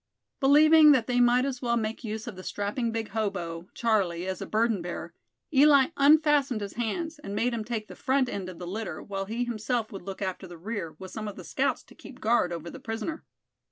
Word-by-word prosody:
Believing 300 +2 +7
that 250 -5 +2
they 245 0 +1
might 245 +1 +4
as 265 -3 -3
well 235 -2 +1
make 220 +2 -3
use 220 -1 -4
of 240 - -7
the 185 - -9
strapping 205 +5 -2
big 225 -1 -3
hobo, 180 -6 -3
Charlie, 190 -7 +1
as 190 -1 -4
a - - -5
burden 220 -3 +1
bearer, 175 0 -6 0.4
Eli 280 -1 +6
unfastened 285 -4 +4
his 200 -1 -5
hands, 305 +8 -3
and 200 -8 -6
made 240 +3 +1
him 225 -2 -2
take 215 -1 -4
the - - -10
front 265 -1 +1
end 195 -5 -4
of 180 - -9
the 180 - -7
litter, 190 -2 -5
while 195 -1 -4
he 230 +4 -2
himself 235 0 -2
would 195 - -7
look 195 +1 -7
after 190 -1 -4
the 175 -1 -10
rear, 185 -3 -5
with 190 +1 -9
some 215 -1 -5
of 205 - -6
the - - -9
scouts - - -1
to - - -18
keep 265 -2 -13
guard 225 -6 +2
over 170 0 -5
the - - -9
prisoner. 225 +8 -4
225 Hz, 225 wpm, -28 LUFS, 195-250 Hz, 0.4 s, Believing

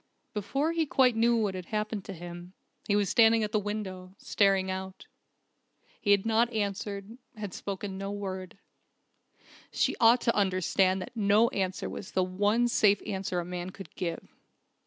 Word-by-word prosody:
Before 275 +10 -1
he 330 -2 0
quite 255 -3 +3
knew 235 +1 +3
what 210 -4 0
had 185 -2 -7
happened 215 -1 -2
to 195 - -6
him, 175 +1 -9 0.3
he 205 - +2
was 205 -1 +2
standing 225 +2 +5
at 210 - -2
the 215 - +2
window, 195 -3 -5
staring 195 -2 +2
out. 190 0 -6 1.0
He 205 - -2
had 200 0 +4
not 225 +2 +2
answered, 205 +1 -4 0.2
had 205 -3 -6
spoken 195 -1 -5
no 195 0 -4
word. 190 -3 -5 1.1
She - - +1
ought 235 +2 +6
to 230 - +1
understand 185 -1 +2
that 240 - -12
no 215 +2 +4
answer 190 -1 -2
was 190 - -8
the 185 - +2
one 205 +6 +1
safe 205 -4 +4
answer 190 -2 -2
a 175 - -4
man 180 0 -5
could 195 +1 -11
give 170 -2 -4
200 Hz, 165 wpm, -29 LUFS, 185-220 Hz, 1.1 s, ought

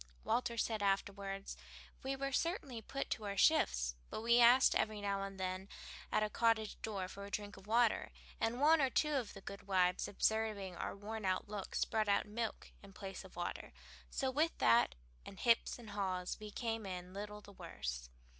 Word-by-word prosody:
Walter 235 -1 0
said 220 -2 0
afterward, 195 0 -1 0.5
"We 270 +1 -2
were 275 0 -2
certainly 275 - -1
put 275 +5 -4
to 215 - -2
our 200 -1 -3
shifts, 60 - +4 0.2
but - - -4
we 235 +1 +5
asked 245 +2 +7
every 215 -1 0
now 200 -1 -1
and 195 -1 -5
then 185 +1 -3 0.4
at 215 - +3
a 215 - 0
cottage 225 -2 +1
door 200 -4 -3
for 200 +2 -8
a 200 - -7
drink 205 0 -4
of 195 +1 -14
water; 230 0 +3 0.3
and 230 +2 0
one 310 +2 +6
or 270 - +3
two 300 +3 +2
of 250 -7 -1
the 195 - -9
good 200 0 -9
wives, 180 -2 +2
observing 210 -3 0
our - - -4
worn 215 +2 -6
out 185 +1 0
looks 205 -2 -2
brought 215 -2 0
out 200 - +3
milk 220 +2 -4
in 200 -1 -14
place 195 0 -7
of 190 - -14
water 175 0 -4 0.4
so 265 -1 -1
with 310 +5 +1
that, 115 - +4 0.3
and 195 - -10
hips 235 -1 +3
and 230 -4 -10
haws, 185 -3 -2
we 215 0 -7
came 225 -1 -3
in 180 -1 -6
little 210 +1 -6
the 205 - -14
worse." 60 - -5
205 Hz, 190 wpm, -37 LUFS, 195-230 Hz, 0.5 s, asked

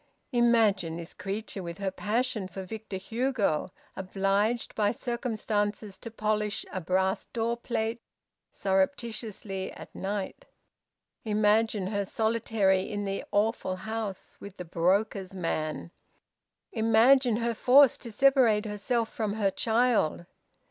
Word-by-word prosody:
Imagine 220 -9 +3
this 170 -1 -8
creature, 200 +1 -5
with 170 -1 -6
her 195 -1 -2
passion 215 0 -1
for 190 +1 -7
Victor 210 0 -6
Hugo, 225 - -1 0.3
obliged 195 +4 0
by 205 -1 +2
circumstances 215 -4 -2
to 230 - -7
polish 215 -1 -1
a 185 - -2
brass 190 +2 0
door 230 0 -1
plate 235 -1 -2 0.5
surreptitiously 195 -1 -2
at - - -11
night! 200 - -4 0.8
Imagine 215 -1 +2
her 200 +1 -1
solitary 220 -2 +1
in 205 +1 -4
the 195 0 -3
awful 205 -2 +1
house 215 0 -5
with 200 -1 -10
the 180 - -6
broker's 190 +3 0
man! 160 -2 -3 0.8
Imagine 230 +2 +4
her 235 0 0
forced 260 +3 +5
to 235 - -7
separate 235 -3 +4
herself 220 +3 -1
from 215 -3 -1
her 205 -3 +1
child! 225 -7 +1
210 Hz, 120 wpm, -28 LUFS, 190-230 Hz, 0.8 s, forced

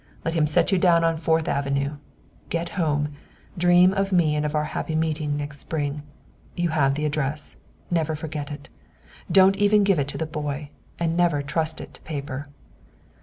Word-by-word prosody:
Let 165 - 0
him 160 -2 +2
set 165 +5 +2
you 190 - +3
down 170 -2 +4
on 165 0 +2
Fourth 160 0 +1
Avenue. 140 +1 -1 0.5
Get 170 0 -2
home, 150 -6 0 0.5
dream 180 +1 +5
of 195 0 0
me 165 -5 +3
and 150 0 0
of 150 - -4
our 150 - +2
happy 160 - -2
meeting 155 -2 0
next 145 -1 -5
spring. 145 -1 -3 0.5
You 175 -1 0
have 140 -3 +2
the 150 +1 -2
address. 150 0 -1 0.3
Never 160 -2 +1
forget 150 -1 -5
it. 145 -1 -8 0.6
Don't 195 0 +6
even 205 0 +4
give 195 -5 +3
it 140 - 0
to 140 - -4
the 160 - -1
boy. 150 -2 -4 0.3
And 165 -1 0
never 170 -5 +2
trust 155 +2 -1
it - - -9
to - - -15
paper." 140 -2 -5
155 Hz, 180 wpm, -24 LUFS, 145-170 Hz, 0.6 s, Don't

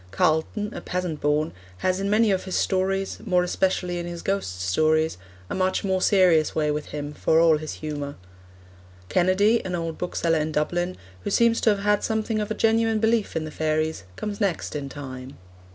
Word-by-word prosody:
Carleton, 160 - 0
a - - -6
peasant 180 -4 -3
born, 150 +2 +1 0.3
has 185 - 0
in 195 +1 -1
many 215 +1 +4
of 190 -1 0
his 185 - -3
stories,... 195 +1 0
more 180 -4 +2
especially 180 -1 0
in 175 - -4
his 170 -1 -6
ghost 95 - -2
stories, 155 - +1 0.3
a - - -5
much 185 0 0
more 190 -1 0
serious 180 -7 +4
way 150 -1 +1
with 150 0 -3
him, 145 0 -5
for 160 +2 +2
all 165 -2 +5
his 155 0 -5
humour. 145 -2 -5 0.9
Kennedy, 190 +5 +3
an 180 -1 -3
old 165 -2 -4
bookseller 165 -2 0
in 155 +1 -1
Dublin, 175 +4 -1 0.3
who - - -2
seems 235 -1 +3
to - - +4
have 205 -2 +2
had 210 0 +3
a - - -17
something 220 0 -1
of 215 +1 -3
genuine 225 0 +2
belief 220 0 +1
in 155 - -1
the 155 - -7
fairies, 155 -2 -1
comes 210 +1 -5
next 190 -7 -1
in 140 -2 -4
time. 130 -2 -8
175 Hz, 190 wpm, -25 LUFS, 155-200 Hz, 0.9 s, all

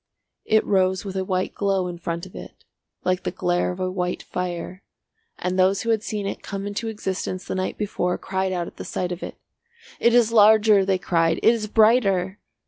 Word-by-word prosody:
It 220 0 +3
rose 190 -1 +1
with 195 -1 -6
a 190 - 0
white 185 -1 -1
glow 195 -2 0
in 175 -1 -6
front 170 0 -4
of 185 - -14
it, - - -11 0.4
like 185 0 0
the - - -2
glare 175 0 0
of 180 - -8
a 185 0 -1
white 180 -1 -2
fire, 180 +1 -5 0.6
and 185 +1 -2
those 190 +1 +3
who 230 - +1
had 220 -2 +1
seen 210 -1 -4
it 200 - -4
come 195 0 -5
into 205 +3 -4
existence 190 -3 -4
the - - -4
night 185 0 -2
before 180 -4 -1
cried 190 0 -2
out 175 -2 -2
at - - -12
the - - -6
sight 180 -1 -3
of 175 - -5
it. - - -6 0.6
"It 235 0 +4
is 235 -2 +4
larger," 215 -2 +6
they 190 -1 +2
cried. 165 -3 +1
"It 230 - +6
is 220 -2 -3
brighter!" 205 -4 +3
190 Hz, 210 wpm, -23 LUFS, 180-210 Hz, 0.6 s, larger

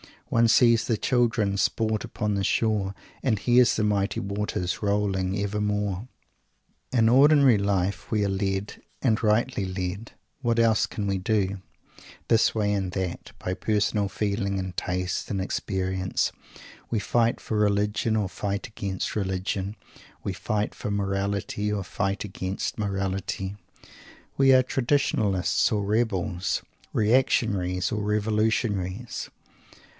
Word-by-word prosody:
One 115 0 +4
"sees 115 0 +5
the 115 - +1
children 115 -5 +1
sport 110 +1 0
upon 105 -1 -2
the 100 -1 0
shore, 100 -2 +1 0.3
and 120 -5 +1
hears 120 +4 +4
the 110 - 0
mighty 100 -1 +1
waters 100 -3 -2
rolling 100 -2 0
evermore." 105 0 -1 0.8
In 115 -3 +3
ordinary 135 -1 +6
life 100 -1 -1
we 105 -2 +1
are 100 - +1
led, 95 +1 -2 0.2
and 115 -4 +2
rightly 110 -1 +1
led 95 +3 -4 0.3
what 120 -2 +1
else 115 -2 +3
can 105 - -4
we 100 -1 0
do? 100 -1 0 0.7
this 115 0 +4
way 105 -2 +1
and 95 -3 -2
that 95 -3 -4
by 90 - -2
personal 105 0 0
feeling 100 0 -1
and 95 -1 -4
taste 90 0 -2
and 100 - -1
experience. 95 -1 -1 0.6
We 115 - 0
fight 115 +3 +1
for 110 - -3
Religion 105 +1 +1
or 105 -3 0
fight 100 +1 -3
against 100 -4 -4
Religion. 95 0 -2 0.5
We 100 - -2
fight 105 +2 -2
for - - -5
Morality 100 +1 -1
or 100 -2 -1
fight 95 +2 -2
against 95 0 -4
Morality. 95 -1 -2 0.8
We 135 -1 +6
are 130 0 +6
Traditionalists 120 -8 +1
or 105 -2 0
Rebels, 100 -4 0 0.3
Reactionaries 105 -6 +2
or 105 - -1
Revolutionaries. 105 0 -1
105 Hz, 130 wpm, -26 LUFS, 95-110 Hz, 0.8 s, ordinary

